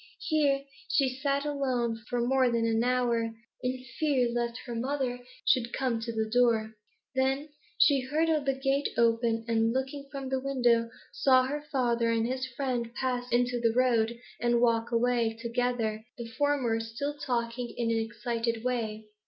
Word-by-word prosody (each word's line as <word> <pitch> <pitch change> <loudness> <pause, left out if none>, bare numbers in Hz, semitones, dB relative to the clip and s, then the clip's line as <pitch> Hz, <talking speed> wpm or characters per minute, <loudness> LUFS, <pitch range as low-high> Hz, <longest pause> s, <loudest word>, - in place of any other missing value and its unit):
Here 285 -3 +2 0.3
she 270 -2 +3
sat 280 +2 -1
alone 260 -5 0
for 245 -1 0
more 260 +1 +3
than 230 -1 +1
an 225 0 +2
hour, 240 -2 +1 0.3
in 255 0 -3
fear 275 -6 +2
lest 235 0 -1
her 240 - -5
mother 250 +1 -2 0.3
should 240 -2 +3
come 250 -4 0
to 230 +1 -4
the 220 -1 -1
door. 225 -2 +2 0.4
Then 270 +3 0 0.3
she 285 -2 +5
heard 300 +6 0 0.2
the 270 - +2
gate 275 +1 +1
open, 230 -1 +2
and, 225 0 +2
looking 270 +2 -3
from 275 -2 -5
the 265 0 0
window, 245 -4 +2 0.2
saw 260 -2 +4
her 290 +3 -3
father 240 -3 +1
and 230 -1 +1
his 260 +1 -2
friend 250 -2 -2
pass 250 -1 -2
into 245 0 +2
the 230 -1 +2
road 235 -2 +2 0.2
and 240 0 +2
walk 230 -1 +2
away 235 -1 +1
together, 235 -2 -1
the 235 - -5
former 245 -1 0
still 225 +6 -3
talking 240 -2 -2
in 230 -1 0
an 225 - +1
excited 230 0 -2
way. 220 -4 -2
245 Hz, 160 wpm, -29 LUFS, 230-265 Hz, 0.4 s, she